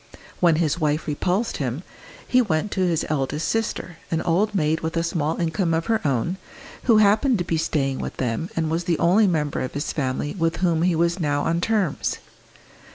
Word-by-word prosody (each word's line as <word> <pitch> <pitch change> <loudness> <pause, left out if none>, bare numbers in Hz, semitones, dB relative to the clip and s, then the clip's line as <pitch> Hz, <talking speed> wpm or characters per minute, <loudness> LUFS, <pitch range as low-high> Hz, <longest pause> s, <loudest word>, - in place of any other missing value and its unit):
When 170 -3 +4
his 160 0 0
wife 150 -1 0
repulsed 180 +9 -1
him, 135 +4 -3 0.4
he 255 - +4
went 200 -2 -1
to - - -3
his 175 -3 +1
eldest 150 +1 -1
sister, 220 -6 -2
an 165 - 0
old 205 +5 +1
maid 155 -3 +1
with 160 +1 -3
a 165 - +1
small 160 -2 -1
income 165 0 0
of 165 0 -1
her 225 -1 +1
own, 140 +5 0 0.5
who 230 -3 +5
happened 215 +4 +4
to 175 - -1
be 170 -1 -1
staying 140 -4 -1
with - - -5
them, 125 +7 -2
and 160 -1 -1
was 165 +1 -1
the 170 -2 +1
only 200 +5 +4
member 150 -5 0
of 130 - -4
his 145 - -2
family 140 0 -2
with 165 0 +1
whom 170 -3 +1
he 175 0 +2
was 170 +3 +1
now 145 -3 0
on 170 +1 0
terms. 205 -7 0
165 Hz, 200 wpm, -23 LUFS, 150-185 Hz, 0.5 s, who